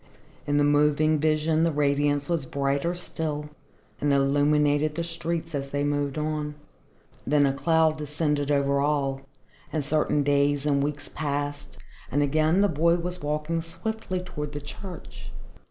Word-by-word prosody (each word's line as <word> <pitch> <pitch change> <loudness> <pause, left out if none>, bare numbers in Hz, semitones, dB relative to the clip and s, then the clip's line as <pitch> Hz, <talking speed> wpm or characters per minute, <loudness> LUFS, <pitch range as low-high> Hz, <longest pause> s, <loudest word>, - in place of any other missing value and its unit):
In 145 0 +2
the 145 - +4
moving 150 +1 +3
vision 155 +1 +2
the 165 - +3
radiance 145 -1 +1
was 165 -6 -1
brighter 140 +6 0
still 150 -4 -4 0.5
and 145 - +1
illuminated 145 +2 +2
the 170 - -1
streets 165 0 -3
as 140 -1 -3
they 145 +1 -1
moved 145 0 -1
on. 150 -1 -2 0.7
Then 145 0 +4
a 135 - +2
cloud 160 +2 +2
descended 150 -1 -1
over 140 -1 +2
all, 140 -2 0 0.5
and 155 -3 -2
certain 150 -1 +1
days 145 0 +2
and 140 -2 +2
weeks 145 0 -3
passed, 145 -1 -4 0.3
and 145 +4 +2
again 155 +5 +2
the 205 - +5
boy 170 0 +3
was 180 +1 -4
walking 150 +3 -1
swiftly 185 +3 -4
toward 150 -5 -6
the 145 - -4
church. 175 +5 -9
150 Hz, 150 wpm, -26 LUFS, 145-160 Hz, 0.7 s, the